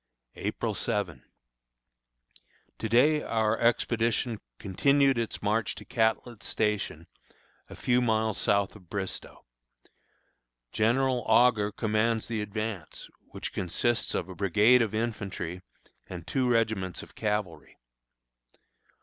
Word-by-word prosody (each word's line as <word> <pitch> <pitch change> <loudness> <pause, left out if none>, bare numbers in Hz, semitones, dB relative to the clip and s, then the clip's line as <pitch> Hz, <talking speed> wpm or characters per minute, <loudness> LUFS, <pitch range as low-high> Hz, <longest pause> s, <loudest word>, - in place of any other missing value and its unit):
April - - -2
7. 80 -11 -2 1.6
To 110 - -3
day 145 +7 +4
our 110 -3 +1
expedition 115 -1 +1 0.2
continued 135 +6 +2
its 115 -2 -4
march 105 0 0
to 105 - -10
Catlett's 115 -1 -1
Station, 105 -6 -1 0.6
a - - -9
few 125 0 +2
miles 110 -2 +1
south 100 -2 +1
of 90 -5 -16
Bristoe. 100 -2 -5 1.3
General 125 +3 +2
Augur 110 -2 +4
commands 110 +1 0
the 115 -2 -3
advance, 105 -4 -5 0.2
which - - -6
consists 115 +7 0
of - - -2
a 95 - -8
brigade 105 +7 +4
of 110 -2 -1
infantry 100 -6 -3 0.5
and 90 -3 -8
two 130 +3 0
regiments 110 -6 0
of - - -15
cavalry. 105 -8 -3
110 Hz, 110 wpm, -28 LUFS, 100-120 Hz, 1.6 s, day